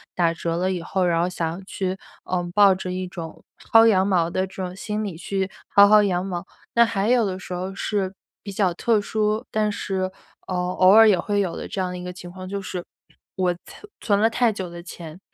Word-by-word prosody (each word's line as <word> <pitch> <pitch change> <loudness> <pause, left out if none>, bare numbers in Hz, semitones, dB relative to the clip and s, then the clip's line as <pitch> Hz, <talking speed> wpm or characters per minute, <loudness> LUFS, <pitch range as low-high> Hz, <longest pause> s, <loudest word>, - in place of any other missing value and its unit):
打 170 -2 +2
折 170 0 -3
了 185 +1 0
以 180 -2 -3
后， 185 +2 -1
然 170 -1 +2
后 175 - +1
想 170 +1 -4
去， 190 -2 -2 0.3
呃， 180 -1 -1
抱 200 -2 +7
着 185 0 -5
一 185 0 -3
种 170 -3 -8 0.3
薅 225 0 +8
羊 195 -4 +4
毛 175 -4 +2
的 185 +2 -1
这 190 - -16
种 180 0 -5
心 210 +2 -3
理 200 -5 -4
去 190 +3 -2 0.3
薅 200 - +9
薅 210 +1 +7
羊 185 -3 0
毛。 180 -1 -5 0.3
那 235 - +6
还 205 -3 0
有 245 -1 +4
的 190 -3 -2
时 185 - -8
候 185 +2 -4
是 195 -2 -1 0.3
比 200 - -7
较 190 -2 +1
特 220 +5 +2
殊， 215 +2 -1
但 215 -1 +1
是， 190 -2 -2 0.4
呃， 185 - -3
偶 180 +1 +3
尔 220 +2 +8
也 190 -4 +3
会 205 -1 0
有 180 -4 -2
的 - - -6
这 195 - -3
样 180 -1 -2
的 180 - -5
一 180 - -7
个 180 0 -6
情 175 -1 -10
况， 185 0 -9
就 200 +1 -4
是， 180 -2 -5 0.5
我 185 -1 +1
存 420 - -14
存 200 -2 +1
了 225 - +5
太 230 0 +2
久 190 -4 -5
的 170 0 -9
钱， 170 -1 -10
190 Hz, 250 characters per minute, -23 LUFS, 180-205 Hz, 0.5 s, 薅